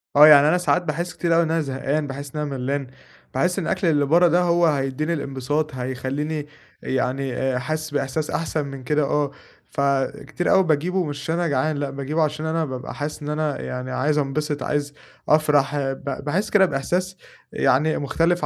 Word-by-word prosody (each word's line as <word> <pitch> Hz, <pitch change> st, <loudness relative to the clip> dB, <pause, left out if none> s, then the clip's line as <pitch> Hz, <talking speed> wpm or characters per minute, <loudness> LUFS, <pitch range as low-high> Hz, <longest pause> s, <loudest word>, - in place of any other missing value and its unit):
آه، 150 Hz, +2 st, +10 dB
يعني 145 Hz, -1 st, +8 dB
أنا 175 Hz, +3 st, +4 dB
ساعات 180 Hz, 0 st, +2 dB
باحسّ 170 Hz, +2 st, -3 dB
كتير 170 Hz, -1 st, +1 dB
اوي 170 Hz, -, +4 dB
إن 160 Hz, -, -2 dB
أنا 165 Hz, 0 st, +2 dB
زهقان، 140 Hz, +2 st, -2 dB
باحسّ 140 Hz, +1 st, -7 dB
إن 150 Hz, -, -2 dB
أنا 140 Hz, -3 st, -3 dB
ملّان، 135 Hz, +1 st, -2 dB, 0.5 s
باحس 180 Hz, +8 st, +1 dB
إن 170 Hz, -, -3 dB
الأكل 185 Hz, -, 0 dB
اللي 145 Hz, -3 st, +3 dB
برّه 170 Hz, +4 st, +5 dB
ده 175 Hz, +2 st, +3 dB
هو 175 Hz, -1 st, +3 dB
هيدّيني 145 Hz, +2 st, 0 dB
الإنبساط، 145 Hz, +1 st, -2 dB
هيخلّيني 135 Hz, +4 st, -3 dB, 0.4 s
يعني 130 Hz, 0 st, -1 dB
حاسسّ 155 Hz, +3 st, -3 dB
بإحساس 145 Hz, +2 st, -1 dB
أحسن 155 Hz, -2 st, -1 dB
من 135 Hz, -2 st, -8 dB
كده، 150 Hz, +3 st, +1 dB
آه، 145 Hz, 0 st, 0 dB, 0.4 s
فكتير 140 Hz, +5 st, -1 dB
أوي 190 Hz, 0 st, +6 dB
باجيبُه، 175 Hz, +4 st, +1 dB
مش 145 Hz, -1 st, -5 dB
عشان 160 Hz, +3 st, -2 dB
أنا 175 Hz, -1 st, 0 dB
جعان، 145 Hz, +2 st, 0 dB
لأ، 140 Hz, -1 st, -2 dB
باجيبُه 140 Hz, +4 st, -2 dB
عشان 155 Hz, +1 st, -2 dB
أنا 160 Hz, 0 st, 0 dB
بابقى 130 Hz, -2 st, -6 dB
حاسسّ 150 Hz, +1 st, -4 dB
إن 150 Hz, -, -4 dB
أنا 150 Hz, -1 st, -1 dB
يعني 125 Hz, 0 st, -5 dB
عايز 150 Hz, +4 st, +1 dB
أنبسط، 145 Hz, 0 st, -1 dB
عايز 145 Hz, -1 st, -1 dB, 0.4 s
أفرح، 150 Hz, -2 st, +3 dB
ب 135 Hz, 0 st, -3 dB
باحسّ 190 Hz, +9 st, 0 dB
كده 195 Hz, -2 st, +5 dB
بإحساس 180 Hz, +5 st, -2 dB, 0.4 s
يعني 150 Hz, +5 st, +2 dB
مُختلف 165 Hz, +5 st, +1 dB
150 Hz, 185 wpm, -23 LUFS, 135-160 Hz, 0.5 s, آه